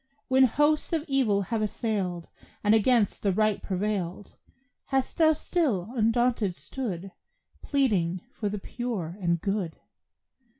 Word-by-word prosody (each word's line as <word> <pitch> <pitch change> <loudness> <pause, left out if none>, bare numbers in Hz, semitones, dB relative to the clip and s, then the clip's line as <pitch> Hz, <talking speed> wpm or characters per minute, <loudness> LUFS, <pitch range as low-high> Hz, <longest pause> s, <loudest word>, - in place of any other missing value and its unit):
When 260 0 +6
hosts 295 +7 +2
of 320 -2 0
evil 240 -8 +2
have 225 - +1
assailed, 200 -6 -2 0.4
And 210 0 +4
against 225 -1 +3
the 200 - +2
right 215 +2 +1
prevailed, 195 -1 -3 0.5
Hast 270 +2 -1
thou 315 -1 +6
still 275 - -1
undaunted 230 -4 +2
stood 195 -8 -5 0.5
Pleading 190 - +1
for 210 - -2
the 210 - -3
pure 200 -6 -4
and 170 -1 +1
good? 195 -3 -2
215 Hz, 125 wpm, -27 LUFS, 190-255 Hz, 0.5 s, When